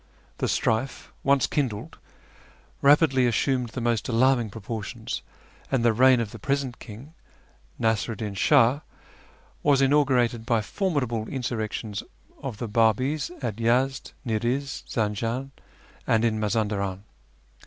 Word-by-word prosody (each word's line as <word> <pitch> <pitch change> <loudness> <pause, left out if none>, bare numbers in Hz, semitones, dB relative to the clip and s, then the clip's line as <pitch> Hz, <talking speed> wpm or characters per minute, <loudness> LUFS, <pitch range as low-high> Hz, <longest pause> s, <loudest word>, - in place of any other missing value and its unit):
The - - 0
strife, 115 +4 -1
once 140 -1 +3
kindled, 125 -8 -3 0.8
rapidly 140 -3 +5
assumed 125 +1 +1
the 125 - -5
most 115 -1 0
alarming 120 -1 +3
proportions, 110 +2 -5 0.5
and 125 -3 +1
the 115 - +5
reign 130 +2 +5
of 110 -3 -2
the 115 - -9
present 135 +1 -2
king, 120 +9 -11 0.7
ISTasiru'd 110 0 0
Din 105 -1 -4
Shah, 115 +7 +4 0.8
was 145 -2 +4
inaugurated 135 -5 +3
by 115 -1 +1
formidable 125 - -1
insurrections 110 -5 -3 0.4
of 125 -6 -5
the 120 - -4
Babis 115 +7 +1
at 110 -4 -2
Yezd, 125 +4 +1
Ni'riz, 120 +5 -1
Zanjan, 115 +5 -2 0.6
and 115 +1 +3
in 110 -2 +1
Mazandaran. 105 -3 -1
120 Hz, 120 wpm, -26 LUFS, 110-135 Hz, 0.8 s, rapidly